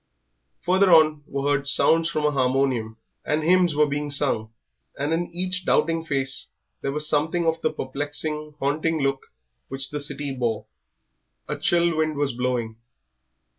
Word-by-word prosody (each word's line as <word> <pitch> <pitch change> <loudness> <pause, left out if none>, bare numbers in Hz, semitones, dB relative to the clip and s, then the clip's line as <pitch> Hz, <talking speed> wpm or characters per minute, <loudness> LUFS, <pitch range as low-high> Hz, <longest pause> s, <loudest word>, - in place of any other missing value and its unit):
Further 185 +1 +3
on 155 -2 +5
were 140 0 -3
heard 140 -1 +1
sounds 165 +3 +3
from 155 -2 -1
a 150 - +3
harmonium, 130 -4 0 0.3
and 155 +1 -1
hymns 175 -1 +3
were 150 +1 +4
being 145 0 -3
sung, 135 -6 0 0.5
and 145 +3 -1
in 170 +1 -1
each 185 +1 -1
doubting 165 -1 +1
face 135 -4 -1 0.3
there 135 - -2
was 150 +1 +2
something 160 +3 +1
of 165 0 0
the 155 - +1
perplexing, 145 +2 -4
haunting 155 +3 0
look 135 -1 -1 0.4
which 135 0 -2
the 150 - -3
city 145 -1 -4
wore. 115 -4 -2 0.8
A - - -2
chill 170 -1 +2
wind 155 -1 0
was 145 -3 0
blowing. 120 -2 -2
145 Hz, 155 wpm, -24 LUFS, 135-160 Hz, 0.8 s, on